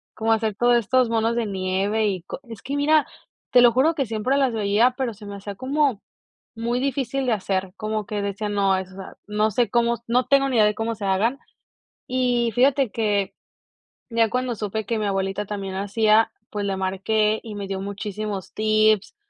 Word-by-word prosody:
como 225 0 0
hacer 220 -2 -1
todos 240 +2 +4
estos 250 +1 +2
monos 230 0 +1
de 235 -2 0
nieve 195 +2 0
y 185 -4 -2
co - - -7
es 225 - -9
que 275 - -3
mira, 300 +1 +3 0.5
te 250 - +7
lo 240 -1 +7
juro 275 +7 +3
que 275 -7 -2
siempre 225 +5 0
las 265 -3 +2
veía, 220 +4 +2
pero 260 -4 -2
se 210 0 -13
me 200 - -6
hacía 200 0 -7
como 265 -1 0 0.5
muy 235 +2 -1
difícil 270 -1 -1
de 245 - +1
hacer, 190 -2 -2
como 215 -1 -3
que 205 0 -3
decía: 200 +1 -3
"No, 200 -1 +1
o 190 0 +1
sea 190 +1 -10
no 210 +1 +1
sé 235 +1 +1
cómo 235 +1 +2
no 245 +1 +2
tengo 275 0 +3
ni 245 - 0
idea 215 - +6
de 210 - +1
cómo 225 +1 -2
se 205 - -6
hagan". 215 +8 +1 0.7
Y 245 -2 +1
fíjate 265 -1 +3
que 205 -3 0 0.8
ya 230 -1 +2
cuando 250 0 -1
supe 215 0 -3
que 225 +1 -1
mi 210 - -1
abuelita 195 +1 -1
también 195 -2 -5
hacía, 215 +3 +2 0.2
pues 205 -1 -3
le 195 -1 -1
marqué 210 +3 0
y 220 -2 -8
me 200 -1 -5
dio 195 0 -4
muchísimos 200 0 -5
tips 215 - +2
215 Hz, 200 wpm, -23 LUFS, 200-240 Hz, 0.8 s, te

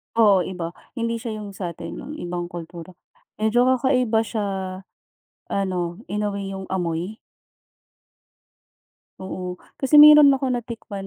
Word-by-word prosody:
Oo, 205 -5 +4
iba. 175 -3 -5 0.2
Hindi 230 -1 -2
siya 225 -1 -5
yung 205 - -7
sa'tin, 180 -4 -6
yung 300 - -8
ibang 175 - -4
kultura. 175 +1 -9 0.4
Medyo 220 +3 +2
kakaiba 255 -3 +2
siya, 220 -1 -3 1.1
ano 180 -2 -2
inuwi 200 -1 -3
yung 190 - -6
amoy? 175 +3 -2 2.0
Oo. 185 -1 -5 0.2
Kasi 270 +2 -1
meron 300 -2 +9
ako 265 -1 -1
natikman 230 -5 -5
205 Hz, 115 wpm, -23 LUFS, 180-235 Hz, 2.0 s, meron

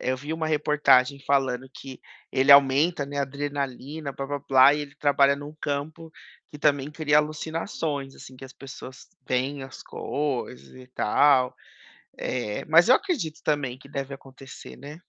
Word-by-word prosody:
Eu 130 0 -1
vi 145 +4 -6
uma 160 0 -2
reportagem 150 -3 +3
falando 135 -2 0
que 130 0 -11 0.3
ele 135 +1 +5
aumenta, 140 +3 +4
né, 140 +1 -6
a - - +2
adrenalina, 140 +1 -5
blá-blá-blá 135 -1 +3
e 150 - -3
ele 145 -1 -8
trabalha 140 -1 +3
num 145 +1 -9
campo 155 +3 -5 0.4
que 150 - -11
também 145 -1 +1
cria 150 -1 +2
alucinações 155 -2 -3
assim, 130 - -13
que 135 - -11
as 130 - -12
pessoas 130 -1 -11 0.2
têm 130 +3 -2
as 135 - -11
coisas 140 -4 -4
e 130 0 -13
tal, 130 +1 +2 0.6
eh, 115 -5 -3
mas 165 +5 +5
eu 255 - +8
acredito 260 - -2
também 135 -5 -1
que 140 - -16
deve 140 -1 -5
acontecer, 135 0 -13
né. 145 +2 -10
140 Hz, 155 wpm, -25 LUFS, 135-150 Hz, 0.6 s, eu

